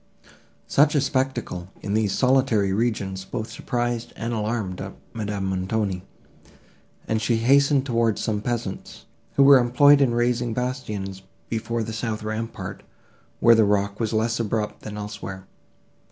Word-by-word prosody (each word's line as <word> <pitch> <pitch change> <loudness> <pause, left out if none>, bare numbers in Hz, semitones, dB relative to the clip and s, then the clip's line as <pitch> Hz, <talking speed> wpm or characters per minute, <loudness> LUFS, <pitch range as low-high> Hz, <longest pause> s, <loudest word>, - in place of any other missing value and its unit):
Such 150 +2 +3
a - - +5
spectacle, 130 - -1 0.2
in 100 - -2
these 110 -2 +1
solitary 125 -7 +3
regions, 100 -4 -1
both 110 +3 -5
surprised 120 -1 -2
and 115 +1 -3
alarmed 105 -4 -2 0.3
Madame 105 -3 -3
Montoni, 95 0 -1 1.1
and 110 0 0
she 120 - +1
hastened 140 +4 +4
towards 115 -4 +1
some 105 -2 -1
peasants, 115 -4 -4 0.3
who 140 - +6
were 140 -1 +8
employed 140 +4 +5
in 120 -4 +3
raising 120 -1 0
bastions 110 -7 -4 0.3
before 115 0 -2
the 110 0 -5
south 110 -1 -3
rampart, 110 +1 -5 0.6
where 115 - +7
the 110 -1 +5
rock 100 -1 +1
was 115 -2 -1
less 115 +1 0
abrupt 110 -1 -2
than 105 -1 -7
elsewhere. 100 -2 -7
115 Hz, 140 wpm, -24 LUFS, 105-120 Hz, 1.1 s, were